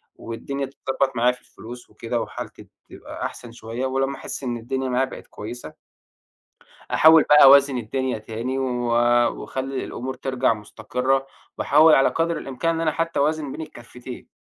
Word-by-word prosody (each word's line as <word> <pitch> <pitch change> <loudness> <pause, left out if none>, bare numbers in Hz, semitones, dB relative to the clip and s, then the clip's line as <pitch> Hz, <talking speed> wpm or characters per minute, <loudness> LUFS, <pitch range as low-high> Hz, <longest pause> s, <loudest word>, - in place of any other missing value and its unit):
والدنيا 140 +4 -5
تتضبّط 135 0 -2
معايا 125 +1 +3
في 125 - -13
الفلوس 120 0 -12
وكده 115 0 -3
وحالتي - - -8 0.2
تبقى - - -8
أحسن 120 - -7
شوية 115 +2 -5
ولمّا 135 +1 -1
أحس 140 - -6
إن 120 -2 -2
الدنيا 130 +3 -3
معايا 130 +1 +1
بقت - - -11
كويسة 110 -5 -8 1.2
أحاول 160 0 +7
بقى 150 0 +8
أوازن 140 -1 +7
الدنيا 125 +1 -2
تاني 115 +5 -4
و 135 - 0 0.8
وأخلّي 135 0 -4
الأمور 130 +2 -5
ترجع 130 -3 0
مُستقرّة 125 +5 -2 0.3
وأحاول 155 +2 +6
على 135 - +4
قدر 165 0 -1
الإمكان 150 +4 -2
إن 165 - -3
أنا 155 -2 +1
حتّى 165 0 -2
أوازن 150 -1 0
بين - - -7
الكفّتين. 125 -3 -10
130 Hz, 155 wpm, -23 LUFS, 120-140 Hz, 1.2 s, بقى